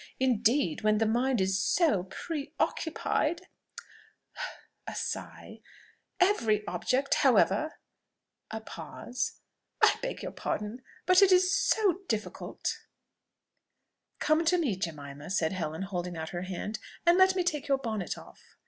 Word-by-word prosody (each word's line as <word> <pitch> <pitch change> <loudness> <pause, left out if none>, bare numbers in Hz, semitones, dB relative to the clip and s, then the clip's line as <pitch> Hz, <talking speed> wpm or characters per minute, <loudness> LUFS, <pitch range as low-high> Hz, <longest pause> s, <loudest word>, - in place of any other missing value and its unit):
Indeed, 240 - +2
when 215 0 +3
the 225 - +2
mind 245 +2 +2
is 190 - +1 0.3
pre 290 - -5
occupied" 335 +1 0 1.4
(a - - -5
sigh) - - -5 0.6
"every 225 - +3
object, 255 +10 0
however" 255 +2 +3 0.8
(a 220 0 -5
pause) 245 +2 -5 0.4
"I - - +5
beg - - -4
your - - -4
pardon, 210 +4 -3 0.2
but 365 +1 +6
it 390 -1 +6
is 365 +1 +5
so 390 -5 +2
difficult 215 -2 -3 0.7
" - - -52
"Come 310 +2 +3
to 360 +3 +4
me, 280 - +1
Jemima," 145 -5 -6
said 170 -4 +1
Helen, 160 -1 -3
holding 180 -3 -4
out 160 0 -4
her 175 +2 -4
hand, 210 +4 -4 0.3
"and 345 +2 +5
let 375 0 +6
me 365 - +2
take 300 -4 -1
your 275 -1 +3
bonnet 220 -8 -3
off." - - -14
235 Hz, 130 wpm, -30 LUFS, 190-320 Hz, 1.4 s, but